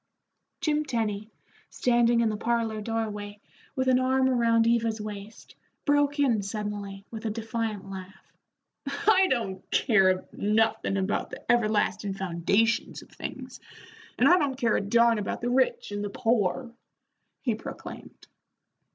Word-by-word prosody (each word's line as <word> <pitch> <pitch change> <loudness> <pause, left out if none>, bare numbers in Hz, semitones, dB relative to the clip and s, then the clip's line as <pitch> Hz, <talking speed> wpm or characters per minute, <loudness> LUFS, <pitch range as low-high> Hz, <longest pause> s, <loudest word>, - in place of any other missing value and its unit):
Jim 305 -1 +1
Tenny, 220 -6 -2 0.4
standing 240 -1 +3
in 230 - +2
the 215 - -2
parlor 225 -1 -1
doorway, 210 -2 -4 0.4
with 260 -1 0
an 255 -1 +4
arm 260 0 +2
around 230 -3 +3
Eva's 230 -1 +1
waist, 210 0 -8 0.3
broke 290 0 +2
in 250 -7 +2
suddenly 200 -1 -5
with 225 -1 -5
a - - 0
defiant 220 -2 -3
laugh. 190 -1 -10 0.5
"I 375 +7 +3
don't 195 -7 -1
care 190 -6 +3
nothin' 210 -1 +1
about 195 +1 -1
the - - -10
everlastin' 215 -3 +1
foundations 195 +5 0
of - - -20
things, - - -7 0.6
and - - +5
I 360 - +6
don't 275 -4 -1
care 235 -4 +2
a - - +1
darn 230 +2 +3
about 205 - -3
the 245 +1 -1
rich 255 -4 +1
and 205 0 -3
the 205 - -3
poor," 230 +3 0 0.7
he 245 -4 +1
proclaimed. 215 - -9
225 Hz, 140 wpm, -27 LUFS, 205-240 Hz, 0.7 s, I